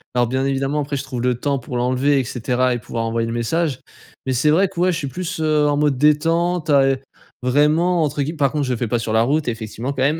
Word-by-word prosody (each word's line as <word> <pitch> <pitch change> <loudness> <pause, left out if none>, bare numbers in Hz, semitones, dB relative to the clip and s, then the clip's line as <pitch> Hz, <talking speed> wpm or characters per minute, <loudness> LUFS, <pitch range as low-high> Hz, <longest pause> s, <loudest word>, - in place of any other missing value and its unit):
Alors 120 -1 +2
bien 130 +3 -1
évidemment 135 +2 -1
après 145 0 -3
je 140 - -3
trouve 130 -3 -5
le 125 0 +1
temps 140 +2 -1
pour 125 0 -8
l'enlever 130 +4 +1
et - - -4
cetera 125 +2 0
et 120 - -2
pouvoir 115 0 -4
envoyer 115 0 -1
le 115 - -3
message 130 +4 -1 0.4
mais 130 - -1
c'est 130 +5 +2
vrai 185 +5 +3
que - - -8
ouais 180 +1 +3
je - - -2
suis 150 -4 -4
plus, 165 +3 -5
heu, 155 -1 +2
en 145 - +2
mode 145 -2 +1
détente, 165 +4 +2
à, 140 -2 +5
heu 135 0 +2 0.5
vraiment 155 +7 +2
entre 145 -1 -1
guill 155 +4 -3
par 140 -3 +1
contre 150 -1 0
je 130 - -2
le 125 - -1
fais 120 - -2
pas 120 - 0
sur 110 -1 -3
la 110 +1 +3
route 145 +3 0
effectivement, 115 +2 -5
quand 135 -2 -2
même. 150 +4 +1
140 Hz, 270 wpm, -20 LUFS, 125-150 Hz, 0.5 s, à